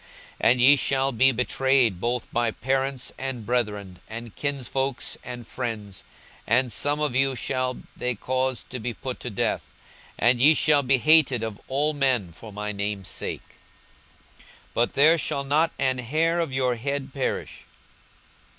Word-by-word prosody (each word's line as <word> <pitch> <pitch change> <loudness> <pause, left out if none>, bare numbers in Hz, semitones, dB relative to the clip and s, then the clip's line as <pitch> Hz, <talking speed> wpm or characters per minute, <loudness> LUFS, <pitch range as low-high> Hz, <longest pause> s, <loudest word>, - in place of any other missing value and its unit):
42:021:016 115 - +5
And 125 0 +2
ye 135 +4 +8
shall 135 0 +1
be 130 +2 +4
betrayed 125 -4 +1
both 120 0 -2
by 120 -1 +1
parents, 135 +2 -2
and 130 -4 -4
brethren, 105 -6 -2
and 115 -1 -8
kinsfolks, 135 -1 -2
and 120 -1 -7
friends; 110 -6 -5 0.4
and 120 +1 +2
some 145 +6 0
of 150 -5 -1
you 135 0 +2
shall 130 +1 -2 0.2
they 125 0 -1
cause 130 +3 -2
to 125 - -4
be 120 0 -4
put 130 -2 -6
to 125 - -5
death. 100 - -2 0.4
42:021:017 120 - +5
And 120 -1 -1
ye 150 +4 +7
shall 150 -2 +4
be 135 0 +3
hated 145 -4 +4
of 110 -2 -5
all 145 +3 0
men 130 - +1
for 105 +6 -12
my 105 +1 -4
name's 100 -2 -3
sake. - - -5 0.5
42:021:018 - - -28 0.3
But 120 +1 +1
there 155 +4 +5
shall 140 -2 -1
not 155 +4 +2
an 130 -2 +1
hair 160 +7 +1
of 165 -5 -1
your 130 -1 +1
head 140 +2 -3
perish. 135 - -3
130 Hz, 165 wpm, -25 LUFS, 115-135 Hz, 0.5 s, ye